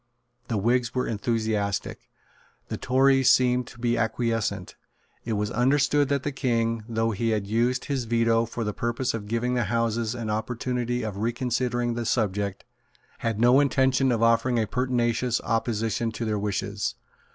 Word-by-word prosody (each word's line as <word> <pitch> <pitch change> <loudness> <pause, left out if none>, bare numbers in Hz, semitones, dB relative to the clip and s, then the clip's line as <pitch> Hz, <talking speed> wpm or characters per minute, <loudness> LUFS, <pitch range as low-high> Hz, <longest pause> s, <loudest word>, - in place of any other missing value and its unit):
The 115 - -1
Whigs 120 +4 +1
were 125 - +1
enthusiastic. 110 -3 -2 0.6
The - - -3
Tories 135 0 +3
seemed 125 -1 +3
to - - -13
be 120 0 0
acquiescent. 115 -1 -1 0.5
It 115 - -2
was 105 +1 -1
understood 145 +3 +2
that 140 -1 0
the 145 - -2
King, 115 -4 0
though 115 0 0
he 115 +2 -1
had 105 -3 0
used 120 +5 0
his 135 -4 -2
Veto 115 0 +2
for 115 +1 -4
the 105 -1 -2
purpose 120 +3 -2
of 105 -3 -5
giving 115 +3 -1
the 120 -1 +1
Houses 115 -1 0
an 115 -3 -3
opportunity 120 +2 -2
of 105 -3 -4
reconsidering 120 +1 -1
the 115 -1 -3
subject, 105 -4 -1 0.6
had 115 -2 -2
no 120 +3 +6
intention 130 -2 +2
of 115 -1 +1
offering 115 +2 +3
a 110 - +2
pertinacious 120 0 0
opposition 115 0 -1
to 115 - -4
their 105 -1 -1
wishes. 100 0 -2
115 Hz, 160 wpm, -26 LUFS, 110-125 Hz, 0.6 s, no